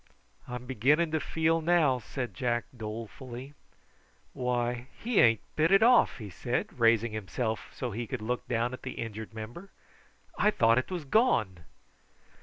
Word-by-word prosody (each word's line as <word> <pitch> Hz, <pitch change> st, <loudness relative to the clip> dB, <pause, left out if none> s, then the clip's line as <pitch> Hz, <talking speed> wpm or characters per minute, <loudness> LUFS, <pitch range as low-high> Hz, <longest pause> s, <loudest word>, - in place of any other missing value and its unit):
"I'm 125 Hz, 0 st, -6 dB
beginning 140 Hz, +7 st, +2 dB
to 160 Hz, -, +1 dB
feel 160 Hz, +2 st, +1 dB
now," 160 Hz, -6 st, +3 dB
said 125 Hz, +2 st, -5 dB
Jack 120 Hz, -3 st, -1 dB
dolefully. 120 Hz, +4 st, -7 dB, 0.8 s
"Why, 120 Hz, 0 st, -1 dB
he 235 Hz, -1 st, 0 dB
ain't 115 Hz, -3 st, +5 dB
bit 160 Hz, +3 st, +3 dB
it 195 Hz, +2 st, +6 dB
off!" 245 Hz, +1 st, +5 dB
he 105 Hz, -5 st, -8 dB
said, 120 Hz, +8 st, -3 dB
raising 115 Hz, 0 st, +4 dB
himself 110 Hz, +2 st, -3 dB
so 125 Hz, -2 st, -4 dB
that 105 Hz, -, -6 dB
he 120 Hz, -1 st, -3 dB
could 125 Hz, -3 st, -4 dB
look 125 Hz, +3 st, -3 dB
down 120 Hz, 0 st, 0 dB
at 130 Hz, -, -7 dB
the -, -, -5 dB
injured 110 Hz, -1 st, -6 dB
member. 120 Hz, -, -8 dB, 0.7 s
"I 210 Hz, -, +5 dB
thought 115 Hz, -, +4 dB
it 130 Hz, -, -5 dB
was 175 Hz, -5 st, -4 dB
gone." 110 Hz, -, +2 dB
125 Hz, 160 wpm, -29 LUFS, 115-155 Hz, 0.8 s, it